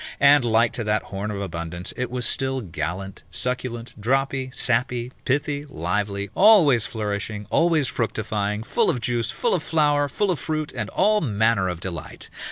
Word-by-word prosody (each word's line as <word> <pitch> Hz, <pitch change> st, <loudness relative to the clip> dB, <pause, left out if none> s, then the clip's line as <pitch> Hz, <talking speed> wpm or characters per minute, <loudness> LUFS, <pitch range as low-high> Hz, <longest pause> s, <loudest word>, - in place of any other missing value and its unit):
And, 145 Hz, -1 st, +6 dB
like 115 Hz, 0 st, +3 dB
to 120 Hz, -, -2 dB
that 105 Hz, 0 st, +1 dB
horn 100 Hz, +2 st, -5 dB
of 105 Hz, -2 st, -4 dB
abundance, 85 Hz, -1 st, -4 dB
it 125 Hz, -1 st, -3 dB
was 125 Hz, 0 st, -2 dB
still 135 Hz, 0 st, 0 dB
gallant, 90 Hz, +1 st, -5 dB
succulent, 120 Hz, +4 st, -3 dB
droppy, 135 Hz, +2 st, 0 dB
sappy, 120 Hz, 0 st, -1 dB
pithy, 145 Hz, +2 st, 0 dB
lively, 100 Hz, -, -2 dB
always 170 Hz, -, +6 dB
flourishing, 105 Hz, -2 st, -3 dB
always 165 Hz, -4 st, +3 dB
fructifying, 110 Hz, -2 st, -2 dB
full -, -, +1 dB
of 125 Hz, -, 0 dB
juice, 120 Hz, 0 st, -1 dB
full 110 Hz, -, 0 dB
of 180 Hz, -, +1 dB
flower, 145 Hz, -2 st, +2 dB
full 200 Hz, +6 st, 0 dB
of 165 Hz, -, -1 dB
fruit, 155 Hz, +4 st, -2 dB
and -, -, -4 dB
all 210 Hz, +2 st, +2 dB
manner 110 Hz, -5 st, +2 dB
of 90 Hz, -1 st, -5 dB
delight. 85 Hz, -4 st, -6 dB
120 Hz, 165 wpm, -23 LUFS, 100-140 Hz, -, And